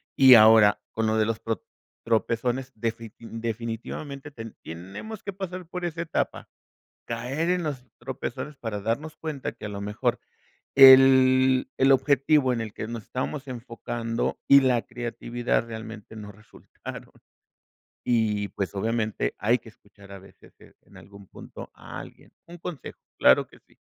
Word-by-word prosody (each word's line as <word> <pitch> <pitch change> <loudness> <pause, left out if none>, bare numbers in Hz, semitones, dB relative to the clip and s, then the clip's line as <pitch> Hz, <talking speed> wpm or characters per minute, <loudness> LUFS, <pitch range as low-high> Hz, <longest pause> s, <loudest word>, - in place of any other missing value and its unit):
Y 130 -2 +8
ahora, 110 -2 +7
con 110 0 -1
lo 110 0 +1
de 110 - +3
los, 115 0 -2
pro 115 -4 -4 0.4
tropezones, 120 +3 -1
defit 115 0 -4
definitivamente 115 +5 -6
ten 115 -4 -9
tenemos 95 - -8
que 200 - -5
pasar 185 -2 -6
por 180 +1 -5
esa 165 -1 -3
etapa. 170 - -3 0.6
Caer 125 +8 -2
en 180 -1 +1
los 140 -5 -4
tropezones 130 +3 -6
para 110 -4 -5
darnos 140 +9 -3
cuenta 155 -4 -4
que - - -11
a - - -4
lo 100 0 -6
mejor 115 +4 -1 0.6
el, 130 -1 +7
el 135 +1 +5
objetivo 140 0 +3
en 120 - -2
el 110 -2 -5
que 110 - -5
nos 115 -2 -6
estábamos 135 +2 -4
enfocando 120 -2 -4
y 140 - +9
la 125 -3 +2
creatividad 120 0 -2
realmente 110 -1 -9
no 105 -1 -9
resultaron. 105 +1 -12 0.9
Y, 105 -4 +1
pues 100 0 -4
obviamente, 110 - -1
hay 115 +4 +2
que 115 - -16
escuchar 100 -2 -17
a 100 - -8
veces 95 - -19 0.3
en - - -21
algún 100 0 -14
punto - - -11
a - - -10
alguien. - - -14
Un 175 +1 -11
consejo, 170 -3 -8 0.2
claro - - +5
que - - -19
sí. - - -27
120 Hz, 155 wpm, -26 LUFS, 110-135 Hz, 0.9 s, y